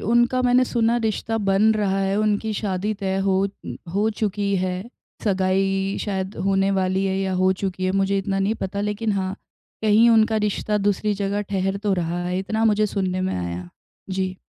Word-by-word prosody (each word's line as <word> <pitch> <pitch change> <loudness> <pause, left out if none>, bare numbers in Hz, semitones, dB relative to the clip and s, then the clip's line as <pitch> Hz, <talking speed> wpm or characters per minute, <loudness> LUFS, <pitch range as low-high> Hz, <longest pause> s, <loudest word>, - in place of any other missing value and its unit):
उनका 240 +3 +2
मैंने 250 +1 +4
सुना 235 -1 +1
रिश्ता 225 +1 -1
बन 195 -1 +2
रहा 195 -2 0
है, 195 +1 0
उनकी 215 +1 0
शादी 200 0 -1
तय 195 -2 -2
हो 195 - +2 0.6
हो 210 +2 +2
चुकी 200 -1 0
है, 185 0 -1 0.5
सगाई 195 0 +1
शायद 190 -1 -3
होने 195 0 +2
वाली 190 0 +1
है 190 0 0
या 190 -1 -1
हो 185 +1 +3
चुकी 185 -1 -2
है 185 - +1
मुझे 195 0 +1
इतना 195 0 -1
नहीं 200 +3 +1
पता। 200 +1 -2
लेकिन 210 +1 -1
हाँ, 190 -1 -1 0.5
कहीं 220 +2 +5
उनका 220 0 +4
रिश्ता 210 +1 -1
दूसरी 205 +1 +1
जगह 200 +1 -1
ठहर 195 0 0
तो 205 0 -1
रहा 175 0 -2
है, 180 +1 -1
इतना 220 +4 -1
मुझे 215 -1 +3
सुनने 185 -2 -1
में 185 0 -1
आया 90 -1 -3
है। 90 -1 -9 0.4
जी। 185 0 -2
195 Hz, 185 wpm, -23 LUFS, 190-210 Hz, 0.6 s, कहीं